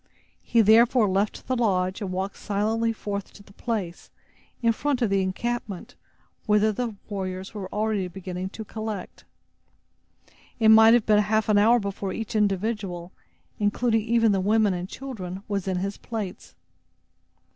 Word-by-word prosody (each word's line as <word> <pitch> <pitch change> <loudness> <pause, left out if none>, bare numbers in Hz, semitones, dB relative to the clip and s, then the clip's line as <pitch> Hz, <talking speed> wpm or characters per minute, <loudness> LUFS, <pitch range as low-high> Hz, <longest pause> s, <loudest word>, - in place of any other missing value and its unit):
He, 235 - +3
therefore, 225 +2 +5
left 195 +2 -1
the 255 - -1
lodge 190 -4 0
and 195 -3 -3
walked 190 +2 -3
silently 220 +3 0
forth 200 -3 -5
to 200 - -14
the 200 - -19
place, 200 -7 -4 0.5
in 230 - +5
front 270 +1 -1
of 215 - +1
the 195 -1 +3
encampment, 200 +1 -3 0.5
whither 210 +1 +4
the 230 0 -3
warriors 190 -1 -5
were 195 -3 -6
already 210 -3 -1
beginning 185 0 -6
to 220 +2 -8
collect. 215 -3 -6 1.3
It 220 -1 +5
might 220 +1 +8
have 240 - +2
been 210 -1 +4
half 215 +1 +1
an 205 -1 +5
hour 230 +4 +5
before 200 -2 -4
each 225 0 -5
individual, 200 -3 -1 0.5
including 220 +2 +1
even 230 0 +3
the 195 -1 +1
women 210 0 +3
and 180 +1 -4
children, 195 -8 -7
was 200 -3 -2
in 185 -1 0
his 195 +2 -3
place. 215 -5 -6
210 Hz, 155 wpm, -25 LUFS, 190-225 Hz, 1.3 s, might